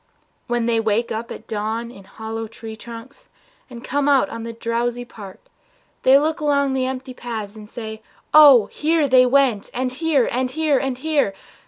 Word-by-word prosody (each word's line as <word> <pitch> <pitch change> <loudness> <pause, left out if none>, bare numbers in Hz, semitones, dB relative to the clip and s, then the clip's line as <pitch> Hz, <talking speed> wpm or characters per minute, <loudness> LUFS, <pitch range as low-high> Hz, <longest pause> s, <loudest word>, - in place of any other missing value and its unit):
When 240 -1 0
they 230 -1 +1
wake 225 +1 0
up 225 +1 -4
at 220 - -9
dawn 220 +2 -3
in 195 -5 -14
hollow 225 +2 -6
tree 225 0 -9
trunks 230 +4 -11 0.4
And 240 -1 -10
come 285 +2 0
out 275 -2 +3
on 230 - -6
the 230 +1 -5
drowsy 235 +1 -2
park, 200 -5 -11 0.6
they 265 +1 +6
look 315 +3 0
Along 280 -2 +1
the 260 -1 0
empty 260 0 -5
paths 225 -4 -6
and 210 -1 -12
say, 220 -2 -7 0.3
"Oh, 285 -8 +8
here 310 -1 +1
They 255 -1 +5
went, 255 -5 +2
and 255 0 -1
here, 290 -2 +1
and 255 +1 -1
here, 300 -1 +1
and 270 -2 -2
here! 285 -8 0
245 Hz, 180 wpm, -21 LUFS, 225-275 Hz, 0.6 s, Oh